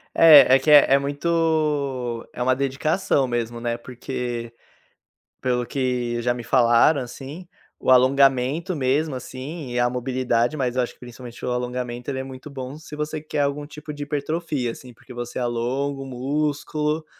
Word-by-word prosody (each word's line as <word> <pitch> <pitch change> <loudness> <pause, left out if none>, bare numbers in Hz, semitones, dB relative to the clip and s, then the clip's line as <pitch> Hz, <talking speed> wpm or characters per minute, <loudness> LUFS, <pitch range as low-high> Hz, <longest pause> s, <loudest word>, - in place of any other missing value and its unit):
É, 145 -6 +8
é - - +4
que 145 - -1
é 145 -2 +7
é 140 - +6
muito 145 -5 -1
é 125 - -3
uma 130 +1 +3
dedicação 140 +1 0
mesmo, 120 -1 -3
né, 120 0 -2
porque, 120 -1 -5 0.9
pelo 125 -1 0
que 125 -2 -2
já 120 +1 0
me 120 -1 -7
falaram, 125 +3 +4
assim, 135 +8 -8 0.3
o - - 0
alongamento 135 +6 +3
mesmo 140 +2 0
assim 130 +3 -7
e 120 - -2
a 120 - +3
mobilidade 125 0 0
mas 125 -2 -1
eu 130 - +3
acho 120 - -4
que - - -29
principalmente 120 -1 -11
o - - -1
alongamento, 125 +1 -3
ele 130 - -3
é - - -2
muito 130 +2 -9
bom 135 0 -7
se 155 -1 -11
você 150 0 -4
quer 155 -1 -3
algum 145 +1 -1
tipo 150 +1 -10
de 145 - -7
hipertrofia, 145 -3 -2
assim, 125 +1 -12
porque 120 - -14
você 120 0 -5
alonga 130 +4 -2
o - - -6
músculo, 150 +4 -2
130 Hz, 170 wpm, -23 LUFS, 125-145 Hz, 0.9 s, É